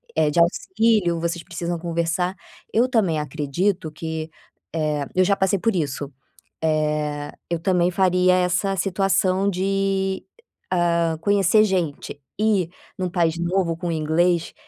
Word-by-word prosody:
eh, 155 -2 +3
de 170 - +1
auxílio, 190 +1 +2
vocês 170 0 -2
precisam 170 0 -4
conversar. 170 +2 -1 0.4
Eu 235 +3 +4
também 195 - +2
acredito 155 +5 -1
que, 160 0 -5 0.4
eh, 150 -3 -1
eu 185 - +5
já 200 +1 +3
passei 195 0 +1
por 225 +2 +1
isso, 145 -4 -2 0.5
eh, 150 -2 -1 0.2
eu 170 - 0
também 180 0 +2
faria 180 0 +3
essa 180 +2 +1
situação 190 +1 +1
de, 195 0 -1 0.5
hã, 170 -2 +1
conhecer 205 +2 +4
gente, 170 -7 -2 0.2
e 210 -6 +2 0.3
num 185 -2 -2
país 170 -2 +1
novo 175 -1 0
com 175 +1 -4
o - - 0
inglês, 165 +2 +1
175 Hz, 135 wpm, -23 LUFS, 160-190 Hz, 0.5 s, eu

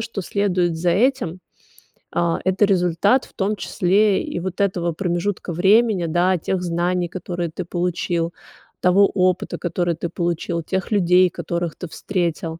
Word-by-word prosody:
что 225 -3 -4
следует 180 -3 0
за 175 +2 +1
этим, 205 -4 +1 0.7
а, 170 -1 +1
это 190 +2 +2
результат, 190 +6 +2
в - - -21
том 205 +2 -1
числе 195 +2 +2
и - - -4
вот 185 +2 -4
этого 175 -4 0
промежутка 180 +1 -2
времени, 195 +2 +3
да, 175 +3 +2
тех 180 +3 -2
знаний, 175 0 -1
которые 175 -2 -4
ты 175 +2 -5
получил, 175 -1 -2 0.5
того 195 +2 +5
опыта, 185 -1 0
который 175 -1 -1
ты 170 +1 -4
получил, 170 0 -2
тех 190 +6 -3
людей, 180 -2 +4
которых 170 -2 -3
ты 180 - -7
встретил. 170 -4 -3
180 Hz, 150 wpm, -21 LUFS, 170-195 Hz, 0.7 s, того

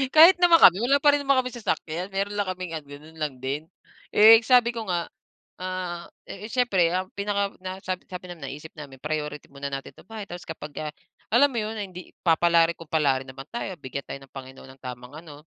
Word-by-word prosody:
Kahit 335 +4 +9
naman 345 -1 +7
kami 185 +2 +8
wala 275 +3 +4
pa 290 -1 +6
rin 290 - +1
naman 275 -1 +3
kaming 250 -1 -7
sasakyan. 175 -3 -2
Meron 200 +1 -2
lang 200 -2 0
kaming 185 -2 -5
ganun 150 +3 -13
lang 150 -3 -2
din. 145 +4 -3 0.5
Eh, 220 +2 +9
sabi 245 -1 +5
ko 225 -2 -5
nga, 175 -1 -1 0.5
ah, 180 -2 -4 0.2
eh, 210 +3 -8
siyempre 205 -10 +2
ang 185 0 -1
pinaka 200 0 -1
na 185 0 -5
sabi 185 -1 -3
sabi 180 0 -7
namin, 175 -2 -7
naisip 150 +3 -9
namin 140 -4 -10
priority 150 -1 -4
muna 140 0 -5
natin 135 0 -6
itong 185 - -19
bahay 220 -2 -6
tapos 175 -2 -9
kapagka 150 -1 -6 0.4
alam 280 +4 +6
mo 245 - -5
yun, 215 +1 -3
hindi 185 -3 -8
papalarin 170 0 +3
kung 165 -2 -12
palarin 135 -4 +1
naman 135 +1 -10
tayo, 235 -5 -4
bigyan 135 +1 -6
tayo 140 - -7
ng 135 - -17
Panginoon 130 -1 -10
ng - - -53
tamang 125 +1 -8
ano, 150 -3 -12
175 Hz, 205 wpm, -25 LUFS, 150-205 Hz, 0.5 s, Kahit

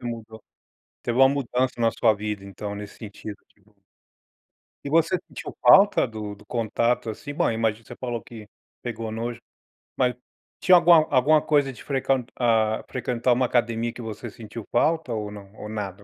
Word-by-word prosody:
mudou. 115 -2 -6 0.6
Teve 120 +1 -1
uma 135 0 +8
mudança 130 -2 0
na 115 - +4
sua 110 - +3
vida, 105 -1 -4
então, 100 +1 -6
nesse 105 0 -8
sentido, 105 -1 -8
que 105 - -32
bom. 105 +2 -29 1.1
E 140 - -4
você 165 +4 +3
sentiu - - -8
falta 200 -4 +7
do 110 -3 -6
do 100 - -18
contato, 115 +1 0
assim? 145 +7 -7
Bom, 145 - +1
imagino 110 -1 -1
Você 120 - -10
falou 120 -3 -4
que 110 0 -11 0.4
pegou 115 -2 -4
nojo. 115 +2 -4 0.6
Mas, 125 -1 +2 0.5
tinha 180 +2 +7
alguma 170 -2 +6
alguma 145 +3 +4
coisa 145 -3 +2
de 125 - -13
frequent 135 -3 0
hã 110 -3 +2
frequentar 125 0 -1
uma 125 +1 +2
academia 120 -1 0
que - - -9
você 115 +1 -6
sentiu 110 -1 -9
falta, 155 0 +1
ou 105 -1 -3
não? 100 -1 -11
Ou 105 - -8
nada?. 100 -2 -5
115 Hz, 170 wpm, -25 LUFS, 110-130 Hz, 1.1 s, uma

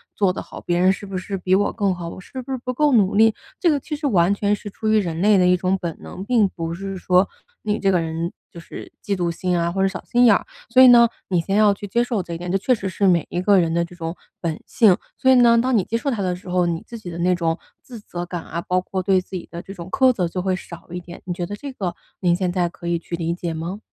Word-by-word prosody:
做 195 -3 +2
得 - - -5
好？ - - -10
别 175 0 0
人 185 +2 +4
是 200 - -8
不 195 -1 -5
是 195 +1 -4
比 185 +1 0
我 200 +1 +2
更 200 -4 +1
好？ 175 -1 -6
我 185 - -8
是 260 +7 -8
不 265 +2 -6
是 - - -1
不 255 - -2
够 295 +1 +2
努 200 -3 +3
力？” 220 0 +5 0.2
这 350 - +3
个 295 - +3
其 300 - -5
实 290 -1 -1
完 190 -5 +3
全 205 0 +1
是 205 - -8
出 220 +2 -5
于 215 - +4
人 170 -4 -1
类 205 0 +5
的 180 - +4
一 180 0 +4
种 185 +1 0
本 170 -2 -4
能， 190 - -8
并 225 -2 +3
不 165 -3 -5
是 195 +2 -5
说 180 +1 +3 0.4
你 210 -1 0
这 195 - +2
个 180 - +3
人 165 +1 -3 0.2
就 170 - -11
是 - - -10
嫉 200 - -1
妒 175 -2 -1
心 180 +1 -1
啊 170 - 0
或 190 +1 -1
者 195 - +4
小 190 - -5
心 245 0 +3
眼 225 - +7
儿， - - -2 0.2
所 255 +2 +6
以 260 - +10
呢， 235 -1 +8 0.2
你 180 -3 +2
先 195 +4 -2
要 210 -1 +5
去 205 - -8
接 235 +5 +1
受 235 -5 -1
这 170 - -7
一 - - -3
点， 175 +1 -6
这 195 - +2
确 250 +6 +2
实 200 -4 -2
是 195 +2 0
每 175 -3 +3
一 175 - -2
个 195 0 +5
人 165 -1 +1
的 170 0 +2
这 175 +1 -9
种 165 0 -5 0.2
本 165 -3 -3
性， 215 -7 +5 0.2
所 260 - +2
以 - - +7
呢， 235 -2 +6
当 250 +2 +2
你 190 - +2
接 230 - -2
受 275 +4 -2
它 215 -4 -2
的 180 -1 -1
时 180 - -14
候， 180 -1 +2
你 165 -1 -2
自 235 - -8
己 180 - -8
的 170 - -7
那 180 +1 +2
种 165 -1 -1 0.2
自 240 -3 -11
责 175 -4 -6
感 175 -1 -5
啊， 170 +1 -5
包 180 +1 0
括 185 +1 -3
对 190 0 +3
自 185 - -12
己 180 - -6
的 170 +1 -7
这 195 - -10
种 175 -1 -9
苛 260 -1 +4
责 180 -7 -1
就 180 +2 -3
会 185 0 0
少 170 -1 -10
一 180 - -4
点， 175 0 -11
你 180 - -3
觉 175 0 -3
得 205 - -5
这 280 +5 -7
个， 180 -7 -3 0.2
您 175 -2 +2
现 180 0 -1
在 175 -1 0
可 170 - -13
以 170 -1 0
去 170 - -5
理 170 0 -2
解 170 -1 -4
吗？ 170 +5 -5
185 Hz, 330 characters per minute, -22 LUFS, 175-210 Hz, 0.4 s, 以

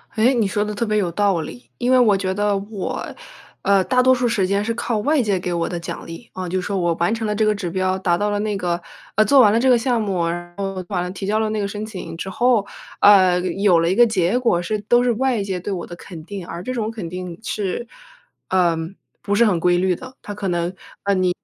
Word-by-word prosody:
诶， 230 +4 +4
你 230 -5 +1
说 205 +2 0
得 210 - -4
特 235 - -1
别 215 -1 0
有 185 -5 0
道 195 -1 +1
理。 245 +10 -10
因 245 +1 0
为 260 - +6
我 215 -5 +4
觉 190 -1 -1
得 205 0 +1
我， 200 0 -4 0.6
呃， 195 -1 +3
大 255 -1 +3
多 260 0 +6
数 250 -1 +1
时 225 -5 +1
间 200 +1 +1
是 230 +2 -1
靠 230 -1 -2
外 290 +6 +2
界 200 -4 0
给 180 0 -3
我 170 -1 -1
的 175 - -3
奖 170 - -7
励。 165 +8 -10
啊， 185 -1 -5
就 185 +2 0
说 195 +2 -2
我 175 -2 +1
完 170 +6 +1
成 225 -1 -3
了 210 - 0
这 215 +1 +2
个 215 0 +2
指 195 -4 -4
标、 185 +1 0
达 175 -2 +1
到 205 +3 0
了 205 0 -1
那 210 -1 -1
个 175 -2 -2 0.3
呃， 215 - +5
做 280 +2 +5
完 210 -5 +6
了 225 - +3
这 260 +2 +3
个 250 - +6
项 240 -1 0
目， 185 -5 -1
然 175 +1 -5
后 195 -2 -3
完 185 -4 -1
了 180 - -4
提 195 +1 -6
交 215 +2 +1
了 220 -1 0
那 215 0 -2
个 200 - -1
申 210 +1 -5
请 190 -6 -7
之 190 - -5
后， 235 +1 +2 0.3
呃， 185 -3 +6
有 185 0 +2
了 165 +1 +2
一 185 - +1
个 240 +2 +7
结 200 -1 +1
果 235 -9 +2
是 210 +5 -2
都 240 +4 +3
是 245 - +2
外 250 -1 0
界 190 -2 -3
对 200 +3 -5
我 180 -3 -3
的 175 - -8
肯 170 -3 -11
定。 195 -1 -7
而 170 +1 -6
这 255 - -3
种 225 -3 -2
肯 215 -7 -6
定 180 -1 -6
是， 210 +1 -3 0.6
嗯， 170 -1 +1 0.3
不 205 - -2
是 235 +3 +5
很 190 -6 +2
规 175 +1 +3
律 185 0 +1
的， 260 +6 -11
它 205 - -7
可 200 -1 -4
能， 175 0 -1 0.3
呃， 200 - +2
你 185 -1 +2
200 Hz, 285 characters per minute, -21 LUFS, 180-220 Hz, 0.6 s, 个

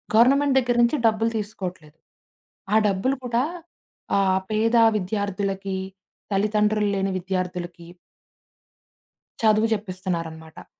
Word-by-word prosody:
Government 275 +4 +5
దగ్గర 245 -1 0
నుంచి 235 +6 +2
డబ్బులు 225 +1 +1
తీసుకోవట్లేదు. 185 -7 -6 0.8
ఆ - - +5
డబ్బులు 200 +8 0
కూడా 240 0 +1 0.7
ఆహ్, 190 -1 +3
పేద 225 +2 +1 0.2
విద్యార్థులకి, 195 -1 -2 0.5
తల్లిదండ్రులు 210 +1 +1
లేని 195 0 -1
విద్యార్థులకి 180 -2 -4 1.6
చదువు 215 0 +4
జెప్పిస్తున్నారనమాట. 175 -5 -5
200 Hz, 90 wpm, -24 LUFS, 185-220 Hz, 1.6 s, Government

